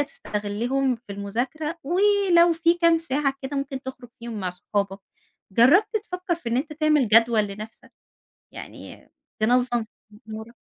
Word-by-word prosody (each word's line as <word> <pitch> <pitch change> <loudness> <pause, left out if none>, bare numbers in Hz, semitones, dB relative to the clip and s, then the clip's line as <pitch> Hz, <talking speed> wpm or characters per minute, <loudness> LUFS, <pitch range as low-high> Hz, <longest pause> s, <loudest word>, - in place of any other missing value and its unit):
تستغلهم 245 0 -2
في 230 - -30
المذاكرة، 250 - -4
ولو 360 0 +4
في 335 +1 +2
كام 335 -1 +3
ساعة 285 -3 -1
كده 270 +2 -4
ممكن 275 -1 -4
تخرج 260 -2 -9
فيهم 230 -2 -6
مع 185 -1 -2
صحابك. 195 +2 -3 0.5
جربت 290 - +5
تفكر 360 -1 -2
في 335 - -6
إن 235 - +1
أنت 305 +3 -4
تعمل 305 -4 +2
جدول 230 +1 +5
لنفسك، 210 +2 -10 0.6
يعني - - -11 0.3
تنظم 240 +1 +2 0.4
أمورك؟ 220 +2 -8
260 Hz, 135 wpm, -24 LUFS, 220-325 Hz, 0.6 s, جربت